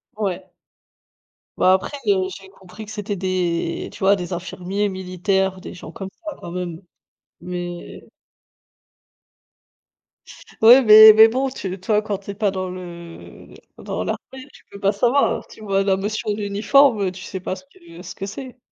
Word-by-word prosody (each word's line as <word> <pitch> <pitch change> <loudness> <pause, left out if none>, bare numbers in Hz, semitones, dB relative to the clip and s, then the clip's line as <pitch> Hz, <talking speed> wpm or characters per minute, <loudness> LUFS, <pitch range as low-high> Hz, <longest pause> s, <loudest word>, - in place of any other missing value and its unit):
Ouais. 200 -4 -3 1.1
Bah 185 - +5
après, 190 +9 -1
heu, 190 -2 +2
j'ai 195 0 -13
compris 190 +2 -12
que 215 - -11
c'était 210 -1 -4
des 180 -3 -2
tu - - -12
vois 195 +1 +4
des 180 -2 -5
infirmiers 185 +3 -3
militaires, 190 0 -1
des - - -9
gens 180 - -10
comme 195 -1 -7 0.2
ça 310 -2 -5
quand - - -8
même. 175 -2 -5 0.6
Mais 175 0 -7 2.6
Ouais 240 +4 +9
mais 215 -1 +10
mais 220 +1 +8
bon 260 +4 -1
tu 190 -7 -6
toi 210 +3 +1
quand 210 -2 -3
tu 200 - -8
es - - -7
pas 205 -1 0
dans 185 -1 -4
le 170 -2 -11 0.2
dans - - -4
l'armée, 265 +2 -6
tu - - -19
peux 200 - -10
pas 200 0 +2
savoir. 245 +7 +1
Tu - - -15
vois 195 -2 0
la 195 -1 +2
notion 210 +2 -2
d'uniforme, 215 +4 +3
heu, 190 -2 0
tu 185 +1 -11
sais 190 - -6
pas 185 0 -4
ce - - -13
que 335 +3 -15
ce - - -9
que 195 - -5
c'est. 255 +5 -8
195 Hz, 170 wpm, -21 LUFS, 185-215 Hz, 2.6 s, mais